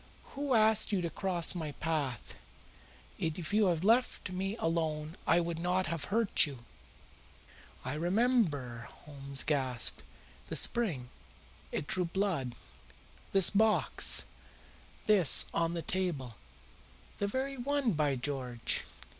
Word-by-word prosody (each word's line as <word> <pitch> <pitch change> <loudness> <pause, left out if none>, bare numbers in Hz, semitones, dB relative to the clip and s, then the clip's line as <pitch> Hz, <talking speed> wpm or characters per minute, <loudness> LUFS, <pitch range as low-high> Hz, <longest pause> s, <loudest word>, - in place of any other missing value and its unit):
Who 280 -2 -1
asked 220 0 +4
you 200 - +1
to 170 - -3
cross 175 -1 -1
my 160 -5 -5
path? 145 -6 -4 0.8
If 160 +3 -3
you 210 -1 +3
had 170 -2 0
left 230 -2 +1
me 195 +4 -3
alone 160 -2 -2
I 170 - +4
would 170 -1 -3
not 180 +2 0
have 160 -2 -3
hurt 215 -4 +2
you." 130 -5 -10 1.2
"I 130 - -3
remember," 165 - 0 0.2
Holmes 140 -2 -3
gasped. 130 - -2 0.5
"The - - -5
spring! 165 - 0 0.6
It - - -3
drew 180 +4 -1
blood. 170 -9 -2 0.8
This 195 -2 +4
box 215 +1 +4 0.8
this 200 -8 +8
on 165 0 0
the 165 - -4
table." 160 -11 -3 0.8
"The 200 - 0
very 265 +5 -3
one, 275 -1 0
by 150 -5 0
George! 125 -3 -3
170 Hz, 120 wpm, -31 LUFS, 145-205 Hz, 1.2 s, this